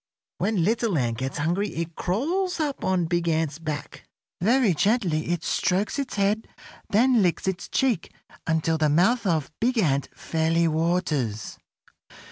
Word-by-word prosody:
When 195 -1 +1
Little 220 -1 +1
Ant 120 -3 -1
gets 135 +1 -3
hungry 175 +7 0
it 165 0 -3
crawls 335 - -1
up 295 -3 -2
on 185 -2 +1
Big 170 0 0
Ant's 160 -2 0
back. 155 -3 -6 0.3
Very 230 0 +3
gently 180 -4 +1
it 170 0 -1
strokes 195 +8 0
its 275 -3 -3
head, 205 +2 +1 0.4
then 240 +2 +4
licks 180 0 0
its 180 -2 -2
cheek 250 -11 0 0.4
until 160 0 +1
the 155 -1 +3
mouth 195 +9 +3
of 155 -5 0
Big 245 +2 +1
Ant 140 -9 +1
fairly 165 +1 +1
waters. 155 - -1
175 Hz, 145 wpm, -25 LUFS, 160-220 Hz, 0.4 s, then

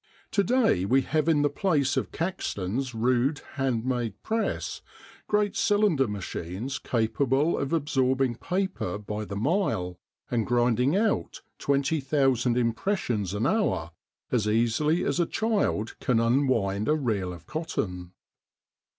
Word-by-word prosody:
To 200 - +2
day 230 - +2
we 130 +7 +3
have 155 +3 0
in 150 -3 +3
the - - +4
place 145 -6 +1
of 130 - -1
Caxton's 130 - -3
rude 125 +5 +1
hand 130 -5 -1
made 120 -5 -2
press 225 0 -2 0.5
great 210 -1 +1
cylinder 205 - +3
machines 100 +4 -4
capable 135 +6 +1
of 140 - -2
absorbing 135 -5 +1
paper 185 - -2
by 105 +1 -5
the 100 - -6
mile, 110 - 0 0.3
and 115 -3 0
grinding 125 - +2
out 205 - 0 0.2
20,000 135 -3 +1
impressions 115 - 0
an 105 +4 0
hour 135 - +1 0.4
as 110 -4 +1
easily 120 +10 +2
as 140 +4 0
a 170 - +2
child 210 - -1
can 125 -4 +2
unwind 115 -5 +1
a 150 - +4
reel 110 -11 -1
of 85 -2 -10
cotton. 90 - -4
130 Hz, 130 wpm, -27 LUFS, 110-155 Hz, 0.5 s, the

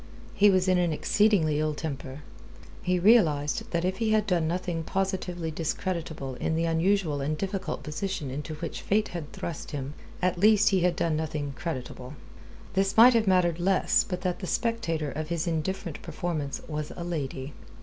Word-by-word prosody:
He 205 0 +5
was 185 -1 +3
in 185 -1 +4
an 175 -2 +2
exceedingly 160 -2 +2
ill 155 -1 0
temper. 140 -2 -6 0.6
He 180 0 +1
realized 170 -8 +3
that 170 0 -1
if 185 +1 -1
he 225 -1 0
had 215 -1 +3
done 175 -5 +1
nothing 175 -1 -2
positively 180 -2 -2
discreditable 160 -3 -3
in 160 - 0
the 165 +1 +1
unusual 165 -2 +1
and 150 +3 -1
difficult 190 +2 -3
position 155 -2 -3
into 150 +3 -5
which 160 +1 -5
Fate 210 +2 +1
had 165 -4 -6
thrust 165 -3 -6
him, 140 -1 -5 0.3
at 180 -1 0
least 210 +1 +5
he 195 -2 +2
had 175 0 +2
done 165 -1 0
nothing 155 -2 -3
creditable. 130 -4 -6 0.6
This 195 +2 +1
might 245 +3 +9
have 225 -3 +2
mattered 180 -3 +3
less 190 +2 +3
but 180 -2 -5
that 180 -1 -2
the 185 - -5
spectator 170 - -1
of 155 +2 -4
his 170 0 -1
indifferent 170 0 -3
performance 155 -4 -4
was 150 -1 -4
a 175 - -5
lady. 145 -4 -4
170 Hz, 175 wpm, -27 LUFS, 155-190 Hz, 0.6 s, might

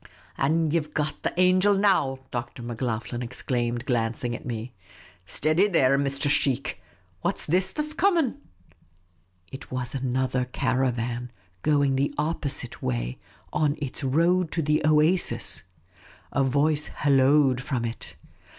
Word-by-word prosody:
" - - -26
An' 160 +3 +2
ye 170 - +3
've 150 -1 -10
got 150 0 -2
the - - -1
angel 185 +2 +4
now," 190 -10 +2
Dr. 120 0 -5
Macloghlen 120 0 -3
ex 120 +1 -6
claimed, 120 -1 -1
glancing 120 -1 -1
at - - -8
me. 115 0 -5 0.5
"Steady, 155 - +2
there, 140 -8 +3
Mr. 140 0 -1
Sheikh. 140 -2 0 0.4
What - - 0
's - - -5
this 185 +4 +1
that 300 - -2
's 305 - -6
coming? 330 -9 +2 0.6
" 90 0 -35
It 135 - -8
was 125 -1 -3
another 130 -1 0
caravan, 125 -2 -1 0.3
going 145 -3 +2
the 140 +1 0
opposite 145 -5 -3
way, - - -2 0.3
on 150 -1 +1
its 140 -1 -5
road 170 +5 +2
to 165 - 0
the 150 +1 +2
oasis! 155 - +3 0.7
A 140 - +2
voice 145 +3 +2
halloaed 135 -2 +3
from 125 -4 -2
it. 115 0 -6
135 Hz, 145 wpm, -26 LUFS, 120-155 Hz, 0.7 s, angel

